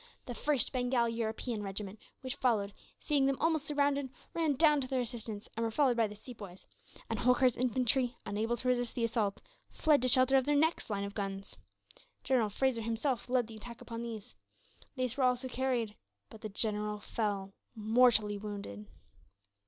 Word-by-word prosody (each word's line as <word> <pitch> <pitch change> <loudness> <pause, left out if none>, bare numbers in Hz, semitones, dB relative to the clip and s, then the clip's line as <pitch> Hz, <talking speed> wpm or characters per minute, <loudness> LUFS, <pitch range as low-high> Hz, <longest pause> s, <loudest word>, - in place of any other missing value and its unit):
The 245 - -5
1st 280 -1 +1
Bengal 245 -2 +1
European 230 0 -2
regiment, 200 +1 -5 0.2
which 260 0 -3
followed, 220 -7 +1 0.3
seeing 280 -2 +2
them 275 -1 +1
almost 315 -2 +1
surrounded, 285 -2 +1 0.2
ran 320 -4 +1
down 300 0 +5
to 255 - -2
their 260 -1 0
assistance; 225 -3 -5
and 230 - -1
were 225 - +1
followed 255 +1 +3
by 230 -2 +3
the 210 - -9
Sepoys; 205 -5 -10 0.4
and 225 -2 -2
Holkar's 250 0 +4
infantry, 250 0 +1
unable 220 +3 -1
to 250 - -4
resist 245 -1 +1
the 235 - -1
assault, 225 -3 0 0.3
fled 300 -3 +3
to 255 - +2
shelter 255 +1 +6
of 260 - +2
their 295 - +2
next 315 -1 +2
line 200 -2 -1
of 200 0 -5
guns. 195 -1 -4 0.7
General 250 -5 +2
Fraser 250 +2 0
himself 230 +3 -1
led 250 -1 +3
the 220 0 -10
attack 235 +2 -9
upon 230 -1 -6
these. 225 - -6 0.6
They 255 -1 0
were 275 - 0
also 250 +1 +2
carried; 250 -4 -1 0.4
but 220 - -12
the 215 - -5
general 210 0 -1
fell, 200 -2 -2 0.2
mortally 220 -2 +3
wounded. 200 - -6
235 Hz, 175 wpm, -33 LUFS, 210-260 Hz, 0.7 s, shelter